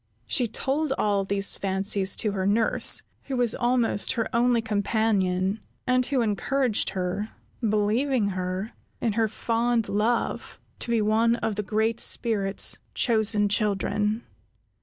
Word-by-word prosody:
She 245 - +1
told 275 +6 -1
all 200 -2 +1
these 195 0 +1
fancies 195 0 +1
to 210 - +1
her 190 -1 -2
nurse, 220 +3 +2 0.2
who 270 -2 -3
was 240 -2 +2
almost 240 -4 +1
her 230 -3 -1
only 240 0 +3
companion, 205 -3 0 0.3
and 255 -1 +2
who 270 -3 +1
encouraged 230 +3 0
her, 185 +4 -2 0.3
believing 215 +2 +1
her, 185 +3 -4 0.3
in 230 -3 0
her 225 +1 +1
fond 230 +1 0
love, 220 +4 -1 0.2
to - - -5
be 230 -2 +2
one 225 +2 +2
of 220 - -2
the 210 - -1
Great 220 +3 -1
Spirit's 205 -4 +2 0.2
chosen 215 -3 +2
children. 210 +1 0
215 Hz, 135 wpm, -25 LUFS, 200-235 Hz, 0.3 s, only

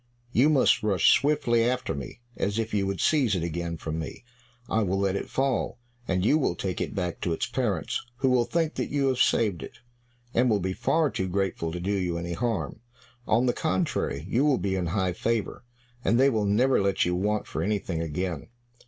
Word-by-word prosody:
You 130 +5 +4
must 140 -5 +4
rush 105 -4 +4
swiftly 140 -6 +2
after 125 +2 0
me, 70 - -7
as 100 +2 -1
if 115 0 -2
you 100 -2 +1
would 95 -2 -3
seize 135 -10 +3
it 85 - -1
again 85 0 -3
from 80 0 -4
me. 80 - -7 0.4
I 110 - +1
will 95 -2 0
let 100 -1 +1
it - - -4
fall, 130 -3 0 0.3
and 95 0 0
you 150 +7 +4
will 110 - 0
take 90 0 -3
it - - -3
back 90 -3 -3
to 85 - 0
its - - -1
parents, 110 -10 -2
who 130 +1 +1
will 125 -2 +3
think 165 +1 0
that - - -3
you 140 -2 +1
have 130 -1 -1
saved 100 -7 +2
it, - - -9 0.6
and 125 +2 +3
will 105 -3 +3
be 95 0 -2
far 150 +7 +1
too 95 - -2
grateful 90 -3 -1
to 90 - -4
do 95 +4 -2
you 90 -3 -1
any 85 +1 -4
harm; 115 +1 -2 0.5
on 115 +4 +3
the 120 - +2
contrary, 155 - -1
you 120 +7 +1
will 145 -3 +3
be 100 -1 -1
in 90 -2 -1
high 90 +1 0
favor, 115 +6 -2 0.4
and 120 - +3
they 135 +1 +5
will 110 -3 0
never 120 +5 +3
let 100 -1 +1
you 90 - 0
want 105 +4 0
for - - -4
anything 95 -5 -1
again." 85 0 -3
100 Hz, 215 wpm, -27 LUFS, 90-125 Hz, 0.6 s, they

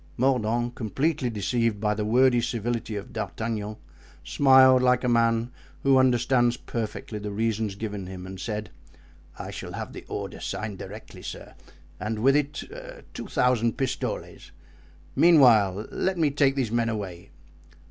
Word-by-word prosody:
Mordaunt, 120 -2 +1
completely 130 - -1
deceived 115 0 0
by 105 0 +1
the 105 0 -2
wordy 120 +3 +4
civility 115 -1 -2
of 100 +4 -7
D'Artagnan, 110 -1 -4 0.5
smiled 130 - +6
like 125 0 +3
a - - +1
man 115 0 +2 0.3
who 135 -1 +5
understands 120 -1 +3
perfectly 110 -1 -5
the 105 0 -5
reasons 110 -1 -1
given 100 -3 -5
him, 90 -1 -8
and 95 0 -8
said: 105 +1 -4 0.7
"I - - -6
shall - - -7
have - - -6
the - - -9
order - - -5
signed 105 -3 -5
directly, - - -10
sir, - - -8 0.5
and 110 +1 -3
with 135 +2 +5
it 145 0 -1 0.5
two - - -7
thousand 120 -2 +1
pistoles; 135 -2 -4 0.7
meanwhile, 115 - +5
let 190 -1 -1
me 155 -4 +2
take 140 -1 +2
these 130 -6 -1
men 115 0 +1
away." 95 -6 -5
115 Hz, 145 wpm, -26 LUFS, 105-130 Hz, 0.7 s, smiled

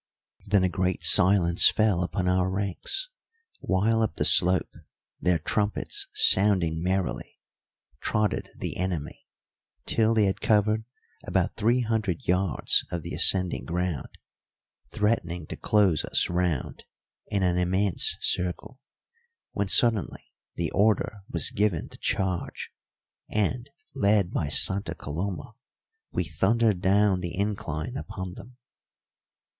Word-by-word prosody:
Then 100 -1 +3
a - - +3
great 90 0 -2
silence 90 -2 +5
fell 105 -5 +1
upon 90 +1 -2
our 90 0 +2
ranks; 100 - -3 0.5
while 110 +4 +1
up 110 -8 -1
the - - -1
slope, 90 +1 +3 0.5
their 90 0 +2
trumpets 105 - -2
sounding 95 - +3
merrily, 95 0 -2 0.6
trotted 105 +4 -1
the - - -5
enemy, 90 -5 -4 0.6
till 115 0 +2
they 110 -2 +4
had 95 - -2
covered 110 +1 +2 0.4
about - - 0
three 120 +4 +2
hundred 110 -7 -2
yards 90 -4 +1
of 85 -2 -4
the 85 - -7
ascending 90 -2 +3
ground, 90 -5 -2 0.8
threatening 90 -6 -1
to - - -7
close 100 -7 +2
us - - 0
round 90 -6 -2 0.4
in 100 -3 -1
an 90 -1 +1
immense 95 +1 +1
circle, 90 +9 -1 0.7
when 100 -1 -2
suddenly 110 -1 +1 0.2
the - - -2
order 105 0 +1
was - - +2
given 100 -6 -1
to - - -13
charge, 95 -3 -2 0.6
and, 120 +5 -1 0.2
led 100 -7 +2
by 75 - -1
Santa 95 +7 0
Coloma, 85 +4 -5 0.6
we - - -1
thundered 95 +6 +1
down 100 0 +3
the 90 -1 -5
incline 100 - -3
upon 95 -8 -6
them. 120 +7 -13
95 Hz, 120 wpm, -26 LUFS, 90-105 Hz, 0.8 s, silence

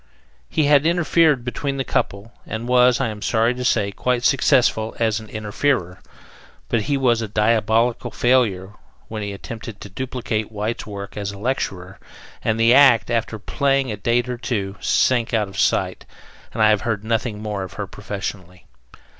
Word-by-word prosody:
He 155 - +1
had 145 -1 +5
interfered 165 -6 +3
between 135 +3 -3
the 135 - -1
couple, 105 -1 -2
and 115 +2 -5
was, 125 -1 +4
I 135 -4 0
am 105 -1 -7
sorry 115 +2 +2
to 125 0 -5
say, 105 -5 +1
quite 125 +4 -1
successful 120 -4 +2
as 110 -2 +1
an 110 -1 -12
interferer; 105 -3 -1 0.7
but 115 - +1
he 140 +6 0
was 120 -4 +2
a 110 - -3
diabolical 110 +2 +1
failure 105 -6 +1 0.4
when 110 -1 -5
he 100 0 -4
attempted 110 +1 -8
to 105 - -9
duplicate 115 -1 -3
White's 110 +3 -4
work 100 -1 -7
as 100 -1 -4
lecturer, 100 -5 -3 0.4
and 110 0 0
the 115 +1 +5
act, 130 -4 +6
after 115 -1 -1
playing 135 +3 0
a - - -3
date 120 +4 0
or 125 -1 -4
two, 100 -6 -3
sank 120 -2 +2
out 105 -2 +1
of 95 - -7
sight - - 0 0.4
and 110 - 0
I 110 - +6
have 105 -2 +2
heard 110 -2 -2
nothing 110 -1 -1
more 105 -2 -4
of 95 0 -7
her 100 - -4
professionally. 95 -2 -7
115 Hz, 170 wpm, -21 LUFS, 105-125 Hz, 0.7 s, act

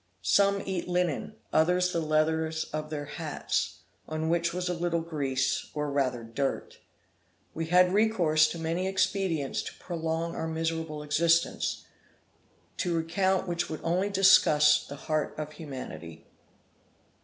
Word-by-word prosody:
Some 200 - +3
eat 190 -3 -3
linen; 180 -4 -1 0.2
others 180 +3 +3
the 170 - 0
leathers 160 0 +1
of 155 0 -3
their 150 -2 -4
hats, 155 +1 -3 0.3
on 155 0 -2
which 170 0 +1
was 180 +1 -3
a 180 - 0
little 170 -1 -1
grease 135 -5 -1
or 150 -1 -2
rather 130 -4 0
dirt. 135 +5 -3 0.7
We 165 0 -3
had 180 +2 +4
recourse 175 -8 +3
to 170 - -5
many 165 +3 -1
expedients 190 -6 0
to - - -8
prolong 165 -1 -3
our 160 - -3
miserable 160 -1 -3
existence, 165 +3 +1 0.9
to 175 -3 0
recount 190 +3 0
which 175 -1 -2
would 155 - -5
only 180 +4 +1
disgust 150 -6 +5
the 140 - -6
heart 155 +1 -2
of 155 0 -5
humanity. 130 - -8
160 Hz, 135 wpm, -28 LUFS, 150-180 Hz, 0.9 s, disgust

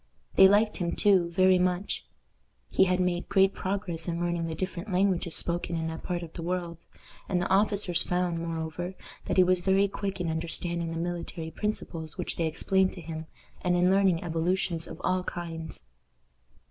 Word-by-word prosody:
They 190 - +8
liked 210 +2 +3
him, 170 -1 -1
too, 190 -4 +4
very 185 +1 +4
much. 180 +2 -1 0.6
He 190 - +5
had 185 0 +1
made 180 -1 0
great 195 -1 +4
progress 185 -4 -3
in 170 -1 -2
learning 175 -1 -1
the 160 - -4
different 185 +3 -4
languages 180 -2 +2
spoken 175 0 -2
in 160 - -2
that 160 0 -6
part 175 -1 -3
of 165 - -9
the 170 - -6
world, 170 -1 -3 0.5
and 180 - +1
the 175 - 0
officers 195 -3 +3
found, 180 -1 0
moreover, 165 +2 -4 0.3
that - - -1
he 185 - +8
was 180 0 +3
very 195 +2 +3
quick 195 -1 -4
in 175 - -1
understanding 170 +1 -2
the 165 - -4
military 170 -1 -4
principles 165 -5 -4
which - - -4
they 165 - +1
explained 190 +4 +1
to 180 - -9
him, 160 0 -6 0.3
and 180 0 +2
in 180 +1 +4
learning 190 -3 +3
evolutions 170 0 -1
of - - -9
all 185 0 +1
kinds. 165 -3 -6
175 Hz, 180 wpm, -28 LUFS, 165-190 Hz, 0.6 s, They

